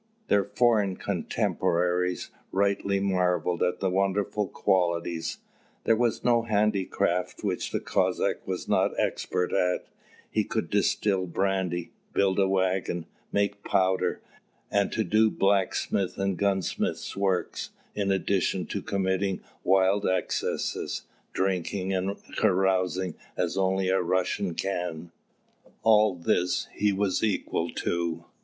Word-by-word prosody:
Their 100 -1 +4
foreign 105 -4 +2
contemporaries 90 +1 0 0.2
rightly 100 0 +1
marvelled 90 -2 +1
at 90 - 0
their 95 -1 +1
wonderful 100 +2 0
qualities. 85 -2 0 0.5
There 115 - +4
was 120 0 0
no 120 -1 +4
handicraft 100 -5 0
which 95 -4 -1
the - - -1
Cossack - - 0
was - - -3
not - - +1
expert 90 - -1
at: 90 -2 +1 0.5
he - - +2
could - - -3
distil 95 -3 +1
brandy, 90 -1 -1 0.2
build 95 -1 +2
a 95 - +4
waggon, 95 -2 0 0.3
make 100 0 0
powder, 95 -1 +1 0.5
and 100 -1 +2 0.2
do 110 +1 +4
blacksmith's 95 -1 +1
and 100 -1 0
gunsmith's 95 -1 -1
work, 95 -2 0 0.3
in 100 -1 0
addition 95 -1 +1
to - - -4
committing 95 0 -1 0.2
wild 95 +2 +3
excesses, 95 - -1 0.3
drinking 95 0 -1
and 95 +2 -1 0.2
carousing 95 -3 +2 0.2
as 90 0 0
only 95 0 +1
a 95 - +3
Russian 90 +1 0
can 90 -3 -3 0.7
all 110 -3 +5
this 90 +1 0
he 105 0 +2
was 100 -1 0
equal 105 -3 0 0.2
to. 85 -1 -1
95 Hz, 115 wpm, -27 LUFS, 90-100 Hz, 0.7 s, all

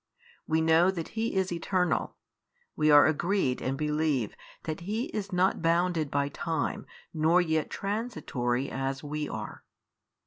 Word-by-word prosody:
We 160 0 +2
know 160 +3 +5
that 170 -4 -3
He 225 -1 -2
is 190 -1 +1
Eternal, 180 0 0 0.6
we 155 0 +2
are 145 -1 +8
agreed 160 -3 +1
and 135 +1 -2
believe 150 -6 0 0.3
that 155 -1 -4
He 210 +8 -3
is 205 -1 -4
not 180 0 +2
bounded 165 -2 +1
by 140 0 0
time, 160 +1 -3 0.3
nor 160 +2 +3
yet 160 -3 0
transitory, 150 - -2
as 135 +1 -3
WE 150 0 -3
are. 110 -1 -6
160 Hz, 140 wpm, -29 LUFS, 145-180 Hz, 0.6 s, are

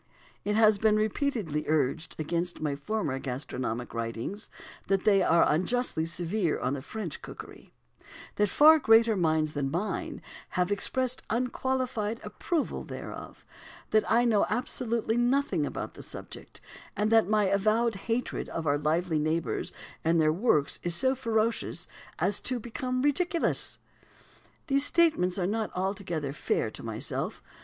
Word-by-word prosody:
It 210 0 0
has 215 -2 +5
been 215 0 +4
repeatedly 215 - -1
urged 155 +2 0
against 170 +3 -2
my 150 -2 -1
former 150 -3 -2
gastronomic 125 -2 -4
writings 115 - -4 0.4
that 195 -1 +1
they 200 -2 +4
are 170 -2 +4
unjustly 185 +1 0
severe 170 +2 -1
on 130 +2 -2
French 185 +1 -6
cookery; - - -11 0.7
that 210 -1 +3
far 310 +8 +7
greater 225 -3 +5
minds 155 -4 +1
than 140 -2 -1
mine 175 +9 -2
own - - -11 0.4
have 180 +2 +1
expressed 255 +5 +1
unqualified 250 -2 -1
approval 335 -4 -2
thereof; - - -8 0.5
that 215 0 +4
I 235 +2 +4
know 215 -4 +3
absolutely 235 -2 -1
nothing 260 +4 +1
about - - -5
the - - -11
subject; - - -10 0.4
and 210 +1 +1
that 225 -4 +5
my 215 -1 +3
avowed 215 +4 +2
hatred 235 +2 -2
of 165 - -4
our 145 -1 +2
lively 160 +2 +1
neighbours 160 +2 -1 0.3
and 165 +1 +3
their 155 -1 +4
works 165 - +1
is 175 -1 -1
so 260 +8 +3
ferocious 230 -3 -1 0.3
as 205 +1 0
to 255 -1 -1
become 255 +3 -3
ridiculous. 335 +4 +1 0.9
These 275 -2 +3
statements 290 - +3
are 180 - 0
not 215 +3 -1
altogether 180 -6 -2
fair - - -1
to - - -9
myself. - - -3
205 Hz, 140 wpm, -28 LUFS, 160-235 Hz, 0.9 s, far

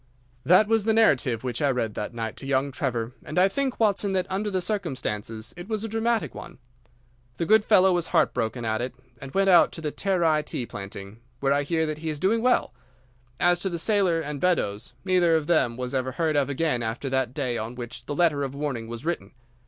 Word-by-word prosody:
"That 185 +5 +5
was 225 -2 +2
the 220 -1 +2
narrative 130 - +3
which 125 -2 -3
I 145 - +3
read 120 -5 -1
that 105 - -4
night 115 -2 -4
to 135 - -8
young 135 0 +1
Trevor, 120 -3 -2
and 155 - -7
I 185 +1 +6
think, 265 +5 -2
Watson, 205 -2 +2
that 185 -1 +1
under 205 +2 -1
the 190 -2 0
circumstances 130 - -3
it 175 +1 -9
was 215 -1 -2
a - - -2
dramatic 225 +1 0
one. - - -10 0.8
The 170 - -1
good 215 +3 +5
fellow 190 -3 +5
was 175 -1 0
heartbroken 115 +1 0
at 110 +1 0
it, 125 0 -4 0.3
and 135 0 -8
went 195 0 +4
out 175 -2 +6
to - - -7
the 150 -2 -2
Terai 170 -5 +1
tea 125 - -5
planting, 100 -1 -8 0.2
where 135 0 +2
I 145 - +2
hear 160 +3 0
that 155 -1 -4
he 160 0 -4
is 150 -2 -4
doing 215 +7 +2
well. 250 - +2 0.7
As 175 0 +3
to 190 - -2
the 170 - -3
sailor 185 -2 +2
and 150 -2 -5
Beddoes, 110 - 0
neither 180 -3 +3
of 160 -2 0
them 135 -8 +2
was 125 +1 -4
ever 130 -1 -1
heard 160 +1 0
of 145 -1 +2
again 140 -3 0
after 115 +4 -3
that 130 -1 0
day 130 -5 -1
on 115 +3 -5
which 120 0 -7
the 145 - -3
letter 155 -3 +2
of 135 -1 -3
warning 140 -6 -3
was 115 +4 -7
written. 165 - -3
150 Hz, 225 wpm, -25 LUFS, 125-185 Hz, 0.8 s, I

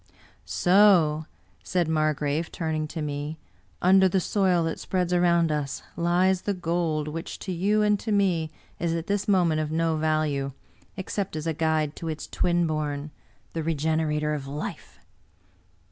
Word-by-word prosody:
IV - - -31 0.3
"So/' 175 -5 +4 0.4
said 180 -3 0
Margrave, 155 0 0
turning 155 -2 -2
to 155 +1 -5
me, 145 +1 -4 0.5
"under 190 +1 +6
the 190 - +2
soil 185 -2 +2
that 165 0 -2
spreads 180 -1 -1
around 170 -2 +3
us 145 -2 -3
lies 180 +2 +2
the 205 - -1
gold 165 -3 -1
which 165 +2 -5
to 190 - -6
you 205 +5 +2
and 210 -1 +3
to 220 - -4
me 185 -6 +2 0.3
is 170 -1 0
at 165 -1 -3
this 200 +1 -1
moment 175 -6 +3
of 155 0 -3
no 165 0 +1
value, 155 -3 0 0.4
except 195 -1 -3
as 155 0 -4
a 165 - 0
guide 155 -1 0
to 165 - -6
its 155 -1 -4
twin 175 -1 +1
bom 150 -2 -2 0.2
— - - -36
the 165 - -2
regenerator 155 -1 0
of 140 -2 -4
life!" 145 +2 -6
165 Hz, 160 wpm, -26 LUFS, 155-180 Hz, 0.5 s, under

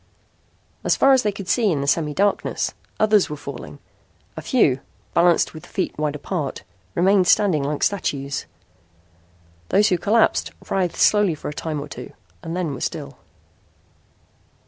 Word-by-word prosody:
As - - +2
far 275 - +5
as 260 - +4
they 210 - 0
could 200 -2 -8
see 220 -1 +2
in 145 -4 0
the - - -2
semidarkness, 165 +7 0 0.3
others 215 -2 +4
were 150 - -5
falling. - - -8 0.6
A - - -6
few, 150 - +2 0.3
balanced 170 0 +3
with 155 - -10
feet 190 - -3
wide 150 -1 -2
apart, 150 -1 -4 0.3
remained 190 0 +4
standing 180 -6 +4
like 145 +1 -2
statues. 140 -8 -1 1.2
Those 210 +2 +4
who 180 -3 +1
collapsed 125 - +2 0.2
writhed 185 -3 0
slowly 205 -4 +4
a 150 - -4
time 155 0 -4
or 145 - -6
two 125 -3 -9 0.3
and 165 -2 -3
were 130 - -7
still. 70 - -5
170 Hz, 145 wpm, -22 LUFS, 145-200 Hz, 1.2 s, far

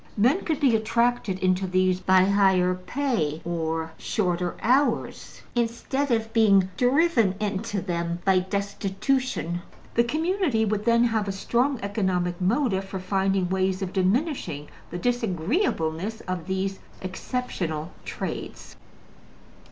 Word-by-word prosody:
Men 255 - +3
could 315 -4 0
be 260 -5 +4
attracted 225 -2 +1
into 185 +1 +2
these 185 0 +2
by 185 0 +4
higher 190 -2 +3
pay 180 - -1
or 165 -1 -2
shorter 180 -3 -1
hours, 265 +5 0
instead 240 +4 -1
of 225 -2 0
being 200 -5 +5
driven 250 - +3
into 205 0 -2
them 170 -2 -2
by 190 -1 +5
destitution. 200 +1 -1 0.3
The 235 - +4
community 310 - +1
would 210 0 -1
then 235 0 +4
have 220 -3 +1
a - - 0
strong 240 +7 0
economic 185 -4 -1
motive 195 -1 +1
for 195 0 -5
finding 190 0 +1
ways 190 0 0
of 185 - -4
diminishing 195 - 0 0.2
the 175 - -5
disagreeableness 210 - -1
of 185 -2 -5
these 190 0 -2 0.2
exceptional 180 - -4
trades. - - -6
195 Hz, 120 wpm, -25 LUFS, 185-235 Hz, 0.3 s, being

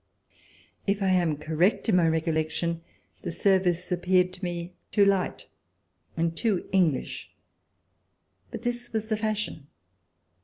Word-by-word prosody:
If 200 0 +1
I 190 - +2
am 170 -5 +2
correct 160 +9 +1
in 215 - +4
my 175 -2 +4
recollec 160 -1 +1
tion, 170 0 -2 0.4
the - - -4
service 180 -1 +2
appeared 180 +1 +2
to 185 +1 -11
me 175 0 -4 0.2
too 205 - +5
light 195 -2 +1 0.7
and 165 0 0
too 210 -4 0
English. 175 -8 +1 1.2
But 220 - -7
this 240 0 -3
was 220 0 -2
the 215 - +1
fashion. 215 -9 -2
180 Hz, 130 wpm, -27 LUFS, 165-200 Hz, 1.2 s, too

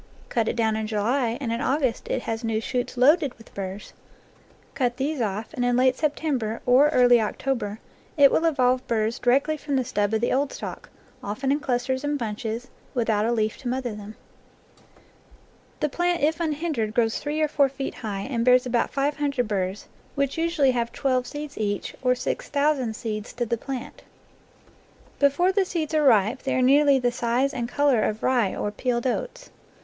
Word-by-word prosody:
Cut 230 -2 0
it - - -1
down 220 -2 +1
in 220 0 -2
July, 230 +3 0
and 240 -5 -2
in 230 - -2
August 265 -3 0
it - - -2
has 225 +1 -3
new 225 -1 0
shoots 245 +2 -3
loaded 285 +2 +4
with 225 - -17
burrs; 195 +1 -6 0.8
cut 245 -2 -1
these 280 0 -1
off, 215 +3 -3
and 250 -5 -2
in 245 0 +2
late 255 0 +4
Sep 300 +1 0
tember, 245 -8 -2
or 260 +4 +5
early 245 -4 +5
October, 215 -1 -2 0.4
it 280 -2 +7
will 330 - +2
evolve 255 -5 +2
burrs 225 0 0
di 245 - +1
rectly 280 +4 +2
from 285 -1 -2
the 260 -2 +1
stub 205 -2 0
of - - +1
the 240 - +1
old 275 +1 +1
stalk, - - -7 0.3
often 215 +7 -2
in 290 - +2
clusters 260 0 -1
and 290 0 0
bunches, 225 +1 -4 0.3
without 225 -3 +1
a - - +1
leaf 220 -2 0
to 270 - -8
mother 250 -2 -2
them. 210 +1 -9 1.7
The 300 - +2
plant 350 +1 0
if 315 +3 +2
unhindered 300 -9 -2
grows 225 -2 +1
three 300 +1 -3
or 310 - +3
four 280 -2 +2
feet 270 0 -5
high 205 -4 -5
and 235 +1 -2
bears 250 +1 +5
about 240 -1 +1
five 285 +2 -1
hundred 280 -5 0
burrs, 195 -1 -2 0.3
which 280 -1 0
usu 335 -2 0
ally 265 - +6
have 235 -2 -1
twelve 255 -2 0
seeds 295 -3 -7
each, 205 -2 -2
or 250 -1 +3
six - - -4
thousand 280 -5 +1
seeds 215 -2 -5
to 240 0 -2
the 235 - 0
plant. 260 +1 -7 1.2
Before 285 +6 +3
the 395 0 +2
seeds 325 -4 -3
are 310 - +3
ripe 230 -1 +4
they 265 - -1
are 255 - +2
nearly 280 +1 +5
the 245 -2 +1
size 240 +4 0
and 240 -2 -3
color 280 -3 +2
of 215 +1 -2
rye 240 -7 +2
or 205 - -2
peeled 240 +2 -2
oats. - - -3
250 Hz, 195 wpm, -25 LUFS, 225-280 Hz, 1.7 s, it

